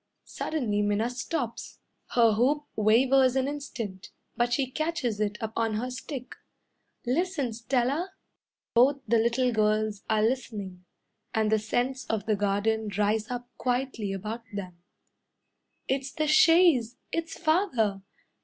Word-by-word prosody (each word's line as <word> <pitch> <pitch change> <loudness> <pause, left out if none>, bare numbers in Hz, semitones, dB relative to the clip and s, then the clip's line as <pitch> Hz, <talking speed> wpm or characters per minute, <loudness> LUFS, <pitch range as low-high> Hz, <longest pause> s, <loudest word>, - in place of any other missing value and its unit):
Suddenly 230 -10 -2
Minna 205 +3 +1
stops. 245 -1 -4 0.4
Her 230 -2 +5
hoop 280 +7 +2
wavers 255 +4 +4
an 265 0 +1
instant, 240 -10 -6 0.3
But 240 0 +1
she 265 +3 +2
catches 260 -5 -2
it 210 -1 -1
up 220 -1 -4
on 225 -1 0
her 250 +4 -2
stick. 255 +1 -7 0.7
"Listen, 285 -2 0
Stella!" 260 - 0 0.6
Both 270 +4 +4
the 230 +1 +4
little 240 +2 +2
girls 215 -1 +1
are 215 -1 +3
listening; 210 -7 -3 0.5
And 220 -1 +2
the 220 - +4
scents 245 +5 -1
of 215 -3 -2
the 215 -2 +2
garden 205 +2 0
rise 210 +2 +1
up 245 -1 -5
quietly 245 -5 -1
about 210 +4 -4
them. 185 -4 -7 1.1
"It's 270 0 -1
the 310 -1 -1
chaise! 305 -6 +5
It's 330 0 -3
Father! 255 - +1
235 Hz, 130 wpm, -28 LUFS, 215-265 Hz, 1.1 s, Her